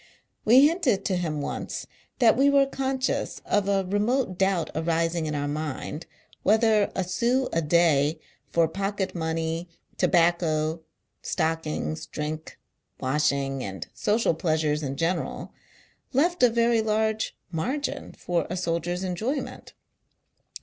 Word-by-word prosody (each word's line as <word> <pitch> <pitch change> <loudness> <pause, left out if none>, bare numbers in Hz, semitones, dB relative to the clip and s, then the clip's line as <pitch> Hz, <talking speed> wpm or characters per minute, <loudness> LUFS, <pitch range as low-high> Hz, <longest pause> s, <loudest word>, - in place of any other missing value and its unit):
We 255 +6 +8
hinted 310 - +1
to 190 - +1
him 160 -4 -2
once, - - -4 0.3
that 230 -3 +5
we 275 +3 +4
were 280 -1 +5
conscious 265 -1 -2
of 200 -1 +1
a 195 -1 +2
remote 205 +3 0
doubt 190 -3 +1
arising 165 0 0
in 150 - -2
our 145 0 -1
mind, 150 +1 -4 0.3
whether 215 0 +3
a 190 - 0
sou 240 +8 +1
a 165 - +2
day 155 -2 +3 0.3
for 165 -1 +3
pocket 195 +2 -2
money, 165 0 -2 0.3
tobacco, 165 -2 +2 0.4
stockings, 160 -1 -2
drink, 155 +1 -5 0.4
washing, 135 -1 0
and 95 -1 -5
social 205 - +1
pleasures 155 -2 0
in 135 -2 -3
general, 170 +4 -2 0.6
left 345 +7 +2
a 250 - +7
very 230 0 +3
large 220 0 0
margin, 275 - -3
for 175 -1 -2
a 180 - -3
soldier's 175 +1 -1
enjoyment. 220 - -3
175 Hz, 125 wpm, -26 LUFS, 160-220 Hz, 0.6 s, We